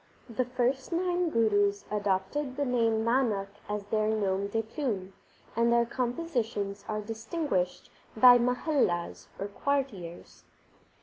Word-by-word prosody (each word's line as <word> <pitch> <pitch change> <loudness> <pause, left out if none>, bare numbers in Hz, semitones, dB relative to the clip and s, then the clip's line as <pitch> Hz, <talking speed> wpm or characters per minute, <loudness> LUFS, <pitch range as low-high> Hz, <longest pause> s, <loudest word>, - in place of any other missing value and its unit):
The 245 +1 -1
first 255 +3 -1
nine 355 0 +1
Gurus 205 -5 +2
adopted 205 +7 -1
the 285 - 0
name 230 -3 +1
Nanak 230 -5 +1 0.2
as 210 0 -2
their 215 +1 0
nom 200 -2 0
de 225 +2 -1
plume, 220 -6 -3 0.4
and 235 +1 +3
their 235 0 +4
compositions 235 -6 -2
are 215 0 -2
distinguished 225 - -2 0.3
by 245 +1 +9
Mahallas 250 - 0
or 200 - -2
quartiers. 205 -7 -3
225 Hz, 120 wpm, -29 LUFS, 205-255 Hz, 0.4 s, by